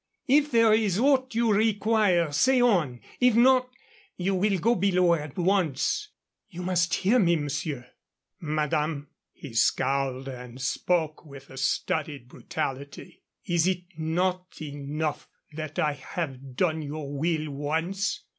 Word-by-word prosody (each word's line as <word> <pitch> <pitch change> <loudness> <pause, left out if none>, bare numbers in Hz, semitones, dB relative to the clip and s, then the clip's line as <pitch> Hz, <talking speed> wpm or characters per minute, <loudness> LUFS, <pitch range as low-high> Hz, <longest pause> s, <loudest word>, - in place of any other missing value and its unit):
If 290 +3 +4
there 230 -3 +5
is 210 -4 +2
aught 260 0 +2
you 230 -2 +3
require, 210 -5 +2
say 255 - +3
on. 175 - +2 0.2
If 250 -2 +4
not, 255 +1 +5 0.5
you 190 +2 0
will 195 +1 +1
go 230 +7 +2
below 180 -4 +3
at 150 -4 -4
once." 185 - +1 0.4
"You 180 -2 -7
must 175 -2 +1
hear 215 +7 +3
me, 170 -5 +4
monsieur." 145 -3 -3 0.5
"Madame" 150 -1 -1 0.2
he 140 -6 -11
scowled 135 +3 +1
and 125 -1 -8
spoke 155 +4 -1
with 140 -3 -13
a 130 - -11
studied 140 -1 -2
brutality 140 0 -6 0.2
"is 175 -2 +2
it 185 -1 0
not 180 +3 -2
enough 145 +1 -4 0.3
that 155 -1 -6
I 150 - +2
have 135 -2 -6
done 160 0 +1
your 145 -1 -6
will 155 0 -1
once? 165 +8 -2
165 Hz, 135 wpm, -27 LUFS, 145-195 Hz, 0.5 s, there